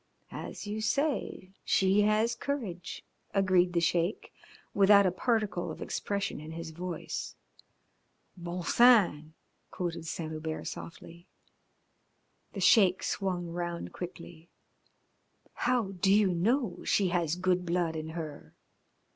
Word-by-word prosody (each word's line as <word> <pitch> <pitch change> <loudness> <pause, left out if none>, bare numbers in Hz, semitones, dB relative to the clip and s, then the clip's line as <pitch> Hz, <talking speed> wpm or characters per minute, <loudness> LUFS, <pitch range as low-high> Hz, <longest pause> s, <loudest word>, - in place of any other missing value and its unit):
"As - - -7
you 210 +1 -4
say, 270 -6 -1
she 195 +2 +3
has 215 +3 +2
courage," 225 -9 -5 0.3
agreed 185 -2 +3
the 170 - +3
Sheik, 170 +4 0 0.4
without 200 0 +6
a 185 - +3
particle 205 -4 -1
of 155 - -7
expression 200 -5 -3
in 155 +1 -8
his 165 0 -6
voice. 175 0 -5 1.0
"Bon 175 0 -5
sang 175 -10 +4 0.2
" - - -45
quoted 170 -2 -4
Saint 160 0 -4
Hubert 155 0 -5
softly. 170 +1 -9 1.3
The 195 - -5
Sheik 185 -1 +5
swung 180 -3 -2
round 175 0 -4
quickly. 170 -2 -9 1.0
"How 245 -6 0
do 190 +1 +1
you 200 -2 +4
know 220 +4 0
she 195 -3 +2
has 170 -3 0
good 180 0 +1
blood 170 -2 0
in 155 0 -4
her?" 155 -3 -7
180 Hz, 120 wpm, -30 LUFS, 170-205 Hz, 1.3 s, without